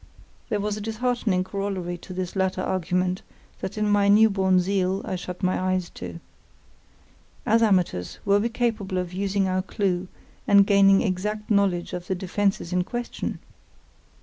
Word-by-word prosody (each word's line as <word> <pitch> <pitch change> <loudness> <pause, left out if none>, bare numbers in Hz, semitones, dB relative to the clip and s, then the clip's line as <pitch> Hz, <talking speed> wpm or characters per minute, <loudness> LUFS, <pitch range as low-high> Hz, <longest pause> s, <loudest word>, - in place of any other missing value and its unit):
There 210 -3 0
was 210 +1 -2
a - - -6
disheartening 225 -3 0
corollary 190 -2 -3
to 185 - -12
this 185 0 -4
latter 190 -1 0
argument 180 0 -1 0.4
that 190 - -5
in 210 0 +1
my 205 -1 +3
new 215 +2 +6
born 190 -2 +3
zeal 190 +1 0
I - - -3
shut 180 +1 -7
my 185 0 +1
eyes 185 -1 -1
to. 85 -2 -8 1.3
As 225 +2 +3
amateurs, 180 - +1
were 200 0 +4
we 230 +3 0
capable 225 -5 -1
of 180 -1 -3
using 195 0 0
our 185 0 0
clue 185 -1 -1 0.4
and 200 -1 +7
gaining 195 -1 +5
exact 210 +2 -2
knowledge 195 -4 +1
of 180 0 -5
the 190 - 0
defences 190 -1 -1
in 180 0 +2
question? 240 +5 -4
195 Hz, 160 wpm, -25 LUFS, 185-205 Hz, 1.3 s, and